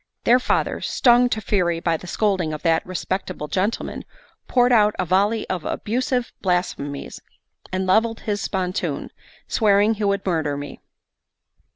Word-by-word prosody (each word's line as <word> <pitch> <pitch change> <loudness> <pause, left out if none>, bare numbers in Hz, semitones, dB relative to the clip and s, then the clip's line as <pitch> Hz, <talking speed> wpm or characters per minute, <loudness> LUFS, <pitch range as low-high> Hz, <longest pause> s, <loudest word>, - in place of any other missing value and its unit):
Their 245 +2 +5
father, - - 0
stung 245 0 +4
to 220 - -1
fury 180 -5 0
by 165 0 0
the 180 - -8
scolding 185 -5 0
of 150 - -6
that 165 -1 +2
respectable 185 -3 -4
gentleman, 195 +8 -2 0.4
poured 245 -1 +3
out 210 -3 +4
a - - 0
volley 200 +5 +1
of 180 -4 -3
abusive 245 +2 -2
blasphemies, 175 -6 -2 0.5
and 185 0 -1
levelled 225 +4 +2
his 205 -2 -2
spontoon, 185 0 -2 0.4
swearing 210 0 +3
he 215 -1 -5
would 200 -1 0
murder 160 -6 0
me. 145 0 -7
195 Hz, 145 wpm, -22 LUFS, 175-220 Hz, 0.5 s, Their